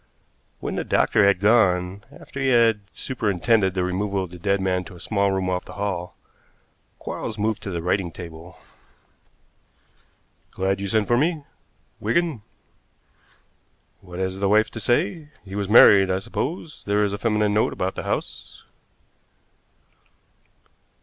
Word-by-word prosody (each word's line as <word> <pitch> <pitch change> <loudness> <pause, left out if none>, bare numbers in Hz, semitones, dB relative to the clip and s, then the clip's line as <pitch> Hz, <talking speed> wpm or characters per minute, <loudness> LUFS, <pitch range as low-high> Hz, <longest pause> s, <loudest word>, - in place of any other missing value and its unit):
When - - -4
the - - -1
doctor 100 - +3
had 100 -2 +3
gone, 100 -3 +2
after 140 - -10
he 135 - 0
had 115 -4 +4
superintended 105 -4 0
the 90 - 0
removal 95 +2 -1
of 90 - -8
the 90 - -10
dead 100 +2 +1
man 90 -1 0
to 90 - -11
a - - -13
small 100 0 0
room 95 -1 -1
off 90 0 -1
the - - -11
hall, 95 -4 -4 0.8
Quarles 110 - -6
moved 110 0 -1
to - - -6
the 85 -3 -4
writing 90 0 0
table. 85 +1 -10 1.9
"Glad 95 +1 -1
you 100 - -3
sent 105 +1 +1
for 120 - +3
me, 155 +2 0 0.6
Wigan. 145 +3 0 1.6
What 90 -2 -11
has 95 0 -3
the 100 0 +1
wife 110 +1 +3
to 110 - -7
say? 120 +6 0 0.2
He 95 - -10
was 100 -1 -3
married, 100 -3 +7
I 95 - +1
suppose? 150 - -5
There 105 +1 +2
is 100 -1 0
a 100 - -4
feminine 105 -1 +1
note 105 - +2
about 95 +1 -2
the - - -5
house." - - -5
100 Hz, 150 wpm, -23 LUFS, 95-110 Hz, 1.9 s, married